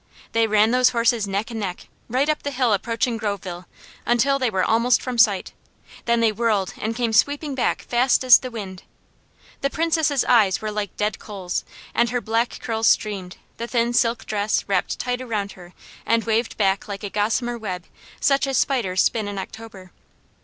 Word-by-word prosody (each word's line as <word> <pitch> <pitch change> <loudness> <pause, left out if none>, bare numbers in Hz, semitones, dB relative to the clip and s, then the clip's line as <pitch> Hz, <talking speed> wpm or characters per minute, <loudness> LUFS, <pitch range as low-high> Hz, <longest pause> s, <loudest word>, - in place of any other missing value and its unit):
They 230 0 +2
ran 215 +1 +3
those 250 0 +4
horses 230 -3 +1
neck 200 +4 -2
and 225 - -4
neck, 185 -4 -5 0.2
right 260 +5 +1
up 305 -1 0
the 285 - -3
hill 250 -5 +1
approaching 230 +3 -1
Groveville, 195 -4 -4 0.4
until 275 +4 +2
they 255 -2 +1
were 190 -3 0
almost 230 +2 +3
from 250 -2 -4
sight, 205 -4 +3 0.5
then 235 0 +2
they 225 -1 +4
whirled 210 -3 0
and 220 +1 -2
came 235 -2 -1
sweeping 285 +6 +2
back 260 - -1
fast 245 +2 +2
as 250 -2 +8
the 255 - -6
wind. 195 -6 -7 0.8
The 275 - +1
Princess' 320 -3 +1
eyes 215 -6 +4
were 215 0 -4
like 210 -1 -4
dead 210 +1 -1
coals, 190 -4 -4 0.3
and 235 - +2
her 245 +2 -1
black 230 +1 -1
curls 225 -1 0
streamed, 195 -4 0 0.2
the 235 - -4
thin 240 0 0
silk 230 -1 +1
dress 210 0 -1
wrapped - - 0
tight 250 0 -2
around 210 -5 -3
her 175 -1 -13 0.3
and 230 0 +1
waved 225 +1 -1
back 195 -2 +1
like 200 0 -6
a 205 - -3
gossamer 230 +4 0
web 185 -5 -5 0.3
such 275 -1 +2
as 270 -2 0
spiders 230 -11 +1
spin 220 -3 0
in 205 -1 -5
October. 195 -2 -9
225 Hz, 185 wpm, -22 LUFS, 205-245 Hz, 0.8 s, as